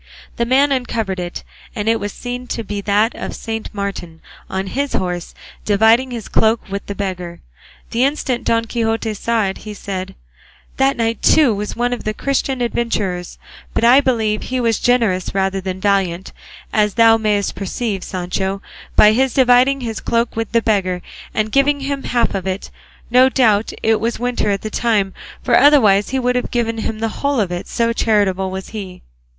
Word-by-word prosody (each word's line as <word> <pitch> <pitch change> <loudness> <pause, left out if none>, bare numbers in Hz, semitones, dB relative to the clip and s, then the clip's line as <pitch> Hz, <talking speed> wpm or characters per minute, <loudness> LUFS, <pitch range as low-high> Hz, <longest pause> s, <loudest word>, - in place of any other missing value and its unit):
The 235 - 0
man 275 +3 +3
uncovered 225 -7 -1
it, 175 0 -5 0.3
and 210 0 -3
it 225 0 +3
was 205 0 -4
seen 245 +2 -6
to 230 - -3
be 205 -1 -4
that 210 +3 +2
of - - -6
Saint 225 -1 -5
Martin 195 -5 -5 0.3
on 190 0 -2
his 275 +8 -2
horse, 180 -2 -3 0.3
dividing 220 +5 +4
his 235 -4 -6
cloak 220 +1 +2
with 200 0 -3
the 200 - -4
beggar. 180 -4 -5 0.5
The 235 +2 +1
instant 270 -3 0
Don 230 0 +1
Quixote 225 -1 -1
saw 225 +2 0
it 190 0 -3
he 210 -1 -8
said, 190 -2 -5 0.6
"This 270 +1 +3
knight 230 -1 -1
too 290 -8 +5
was 210 +1 -4
one 245 +1 0
of 240 - -5
the 215 0 -2
Christian 270 -1 -1
adventurers, 210 -7 -2 0.4
but - - +1
I 250 +4 +7
believe 220 -5 0
he 255 0 -3
was 230 -3 +1
generous 220 -8 +1
rather 195 0 0
than 185 0 -4
valiant, 190 -2 0 0.4
as 210 -2 +2
thou 225 -1 +6
mayest 210 -2 0
perceive, 200 0 -3
Sancho, 190 +2 -3 0.4
by 210 - +7
his 260 +3 +1
dividing 260 +1 +4
his 225 -3 -4
cloak 235 0 -1
with 225 -1 -3
the 230 -1 +2
beggar 185 -5 0 0.3
and 215 0 -1
giving 280 +2 +2
him 275 0 -3
half 240 -1 +1
of 190 -1 -3
it; 190 +1 -4 0.4
no 255 +2 +6
doubt 225 -5 +2
it 220 -1 +3
was 230 +2 -1
winter 245 -3 -1
at 200 -1 -1
the 215 - -4
time, 205 -5 +1 0.3
for - - +3
otherwise 225 -9 +5
he 265 - -1
would 250 -1 0
have 250 - -1
given 230 -2 -1
him 220 0 -3
the 225 -1 -3
whole 280 -2 +1
of 195 -4 0
it, 175 0 -4
so 230 0 0
charitable 200 -5 +1
was 190 0 -6
he." 195 -4 -8
220 Hz, 185 wpm, -18 LUFS, 195-245 Hz, 0.6 s, I